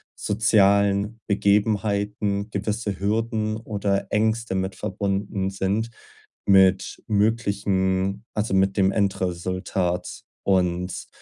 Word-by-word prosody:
sozialen 100 0 +2
Begebenheiten 100 0 +1
gewisse 105 0 -2
Hürden 110 +1 -1
oder 100 -3 -2
Ängste 110 -1 0
mit 95 0 -2
verbunden 100 -1 -2
sind, 100 +4 -1 0.6
mit 95 -1 +3
möglichen 100 -2 0
also, 105 -2 -1
mit 95 +1 +2
dem 95 0 +4
Endresultat 90 -2 -2 0.2
und 90 -1 0
100 Hz, 85 wpm, -24 LUFS, 95-105 Hz, 0.6 s, dem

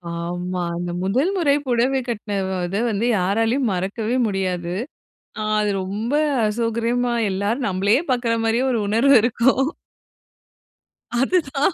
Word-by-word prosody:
ஆமா. 175 +1 -3
அந்த 175 0 -3
முதல் 260 - +1
முறை 290 -6 +3
புடவை 250 +2 +2
கட்டின 210 -3 -3 0.3
இத 200 +5 -2
வந்து, 210 +3 -1
யாராலயும் 225 +6 +1
மறக்கவே 210 +6 -2
முடியாது. 180 -3 -2 0.9
அது 210 -1 +1
ரொம்ப 215 +8 -3 0.3
அசௌகரியமா, 235 +2 0 0.2
எல்லாரும் 210 +7 -1
நம்மளையே 200 - +2
பார்க்கிற 240 -2 0
மாரியே 230 +3 +1
ஒரு 230 - 0
உணர்வு 250 +6 +4
இருக்கும். 255 +3 +2 1.5
அதுதான். 290 +1 +1
225 Hz, 115 wpm, -21 LUFS, 195-250 Hz, 1.5 s, உணர்வு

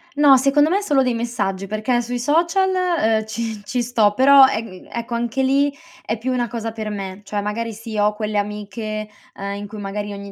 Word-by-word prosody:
No, 285 -2 +7
secondo 280 +3 +3
me 395 +3 +2
solo 290 -9 +2
dei 250 -1 +1
messaggi, 205 -5 -2
perché 215 +4 0
sui 245 +1 -4
social, 335 +9 +2 0.5
uhm, 220 - -6
ci 220 -1 -4
ci 245 +5 -2
sto 225 -4 +2
però, 270 +2 +8
ehm, 215 -6 -5
ecco 235 +1 -5
anche 240 +3 -1
lì 280 +2 +3 0.3
è 220 - -2
più 250 +4 -3
una 245 -1 0
cosa 225 0 -4
per 220 -1 -5
me, 195 -1 -6
cioè 205 +1 -3
magari 225 +3 -3
sì 225 0 -7
ho 210 +1 +3
quelle 210 0 -3
amiche, 210 +1 -4 0.3
ehm, 200 0 -4
in 205 0 -6
cui 210 +1 -9
magari 205 +1 -4
ogni 200 0 -8
225 Hz, 205 wpm, -21 LUFS, 210-255 Hz, 0.5 s, però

